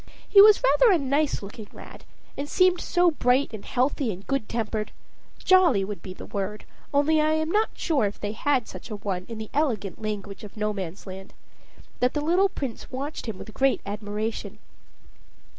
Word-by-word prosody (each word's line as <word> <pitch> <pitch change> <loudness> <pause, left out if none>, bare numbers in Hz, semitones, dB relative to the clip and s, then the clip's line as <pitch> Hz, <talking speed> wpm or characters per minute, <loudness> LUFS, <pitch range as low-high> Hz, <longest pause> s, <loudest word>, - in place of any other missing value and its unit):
He 400 - +8
was 425 +3 +7
rather - - +5
a 365 - +5
nice 280 -3 0
looking 205 +2 -9
lad; - - -12 0.3
and 285 +1 -5
seemed 365 -1 +3
so 350 -1 +3
bright 255 -3 +1
and 215 - -7
healthy 255 -1 0
and 190 +1 -9
good 275 -6 -2
tempered 220 -2 -2 0.5
"jolly" 345 - +4
would 200 -3 -6
be 185 - -8
the 185 - -9
word, 205 +1 -4 0.3
only 305 +2 +3
I 310 +1 +2
am 315 +1 0
not 430 +3 +2
sure 290 -10 +1
if 205 - -4
they 205 - -3
have 255 +2 0
such - - -9
a 215 - -4
one 190 -3 -4
in 230 - -6
the 220 -1 -7
elegant 225 -10 -1
language 205 -2 -5
of 210 +1 -11
Nomansland 190 -2 -5 0.7
that 250 +3 +1
the 295 - 0
little 355 +6 +3
Prince 270 -10 -6
watched 275 +1 -5
him 215 -4 -4
with 220 - -10
great 270 0 +2
admiration. 210 0 -4
235 Hz, 180 wpm, -25 LUFS, 205-305 Hz, 0.7 s, He